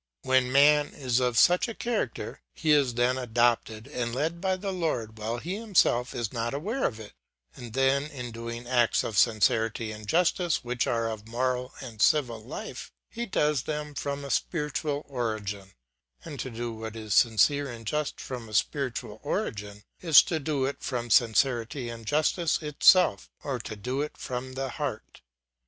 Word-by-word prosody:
When 130 -1 +2
man 145 +2 +5
is 130 -3 0
of 125 -2 0
such 180 - +5
a 230 - -6
character, 240 -1 -3
he 160 -2 +1
is 140 -5 +3
then 125 +2 +2
adopted 120 -2 +1
and 125 -4 -3
led 160 +5 -2
by 190 -1 +1
the 195 +1 -4
Lord 120 -11 -2
while 115 +2 -2
he 175 +10 -4
himself 185 - +2
is 115 -3 -3
not 120 +2 -2
aware 215 - -2
of 115 - -7
it, 105 -2 -10 0.4
and 120 -3 -9
then 135 +2 +2
in 125 -5 -7
doing 115 +1 -6
acts 120 -2 +3
of 110 - -4
sincerity 110 +1 +2
and 105 -1 -9
justice 175 - +1
which 120 0 -1
are 115 -1 0
of 110 -1 -6
moral 125 +2 -1
and 115 -5 -8
civil 120 -7 +3
life, 155 - -7 0.2
he 235 +1 -4
does 150 -6 +1
them 150 0 -4
from 140 0 -4
a 140 - -5
spiritual 150 -2 -1
origin; 110 -7 -4 0.5
and 145 - -7
to 130 - -3
do 120 0 -4
what 110 0 -7
is 110 -2 -4
sincere 135 +6 +4
and 115 -1 -10
just 150 +5 -2
from 120 -4 -7
a 105 - -6
spiritual 120 -4 -1
origin, 105 - -4 0.2
is 165 -4 +7
to 160 - -2
do 140 -2 -1
it 140 - -4
from 120 -3 -3
sincerity 120 +2 +2
and 115 -2 -9
justice 155 +3 +1
itself, 150 - +4
or - - -2
to 110 - -6
do 125 +7 -3
it 150 - -5
from 130 +1 -5
the 135 0 -3
heart. 130 -4 -5
125 Hz, 175 wpm, -27 LUFS, 115-150 Hz, 0.5 s, is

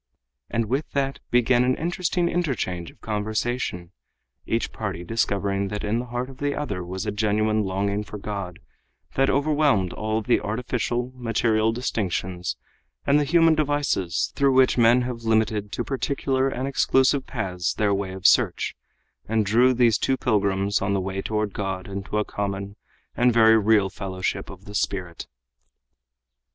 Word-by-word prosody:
And 115 0 0
with 135 +7 -2
that 135 -1 -1
began 120 0 +3
an 130 +1 +2
interesting 175 +1 -1
interchange 110 - -2
of - - -19
conversation, 110 -4 -2 0.6
each - - -1
party 85 - -4
discovering 100 -1 0
that 105 +1 -4
in 105 +3 0
the 125 - -4
heart 120 +1 -3
of 135 -1 -12
the 145 0 -1
other 100 -11 -3
was 95 +4 -5
a 105 - -1
genuine 110 +1 +1
longing 100 +2 -1
for 105 - -8
God 100 -3 -5 0.6
that 135 0 +2
overwhelmed 140 - +2
all 110 0 -2
the 120 - +3
artificial, 120 +3 -2
material 115 -2 +1
distinctions 90 - -2 0.5
and 140 +1 +4
the - - +2
human 165 +2 +4
devices 145 - 0
through 140 -1 +3
which 130 0 +5
men 120 +1 +5
have 120 -1 -4
limited 110 -2 +1
to 120 - -2
particular 135 0 0
and 130 0 -3
exclusive 135 0 +2
paths 90 -8 -2
their 105 -1 +1
way 100 -1 -2
of 95 +1 -9
search, - - +3 0.5
and 110 -1 +2
drew 120 +5 +4
these 120 -4 +3
two 135 - +1
pilgrims 100 -4 +1
on 100 0 0
the 100 - +1
way 95 +1 -3
toward 105 -1 -2
God 95 -2 -3
into 100 +1 -4
a 105 - +1
common 100 0 -4 0.4
and 125 0 +4
very 115 -1 +6
real 105 -3 +3
fellowship 95 -2 -4
of 95 0 -12
the 105 - -10
spirit. 90 -4 -3
110 Hz, 160 wpm, -24 LUFS, 100-130 Hz, 0.6 s, very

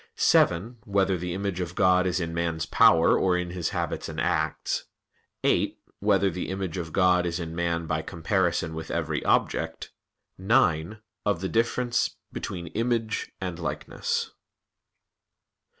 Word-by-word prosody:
(7) 100 +9 +3
Whether 95 -1 +1
the 90 0 -3
image 100 -2 -2
of 90 0 -4
God 90 -1 +4
is 90 0 0
in 85 -2 -3
man's 85 -1 -1
power 80 0 +5
or 90 -2 +2
in 90 -1 -3
his 90 -3 -2
habits - - -3
and - - -5
acts? - - -1 0.6
(8) - - +2 0.2
Whether 100 -1 +3
the 90 +1 -4
image 95 -2 -3
of 80 -2 -4
God 90 -1 +3
is 85 +1 -2
in 80 -1 -5
man 85 -1 -1
by 80 -1 -1
comparison 85 0 0
with 80 0 -6
every 80 -2 -2
object? - - 0 0.5
(9) 95 -3 +2 0.3
Of 95 -4 0
the 95 - -2
difference 120 +1 +1 0.2
between 90 -3 -5
"image" 115 -1 -1
and 90 -2 -4
"likeness." 85 - -2
90 Hz, 145 wpm, -26 LUFS, 85-95 Hz, 0.6 s, power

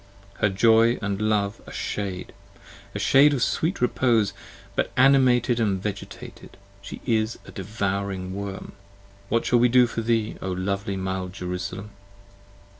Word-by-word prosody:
Her 105 - +3
joy 115 +4 +4
and 100 0 -3
love, 105 0 0
a - - -9
shade: 95 -3 -4 0.6
a - - -1
shade 145 +2 +5
of 125 - 0
sweet 165 0 -1
repose: 120 -4 +2 0.4
But - - 0
animated 125 -2 +4
and 100 -4 +1
vegetated, 100 0 -8 0.2
she 100 - -9
is 110 -2 0
a - - -11
devouring 100 -2 -3
worm: 100 0 -6 0.6
What 115 +1 +1
shall 120 - +3
we 120 +1 +4
do 125 +1 +6
for 115 -1 -4
thee, 115 -1 0
O 95 - -3
lovely 100 +2 -2
mild 95 -1 -3
Jerusalem? 90 +3 -5
105 Hz, 140 wpm, -24 LUFS, 95-120 Hz, 0.6 s, do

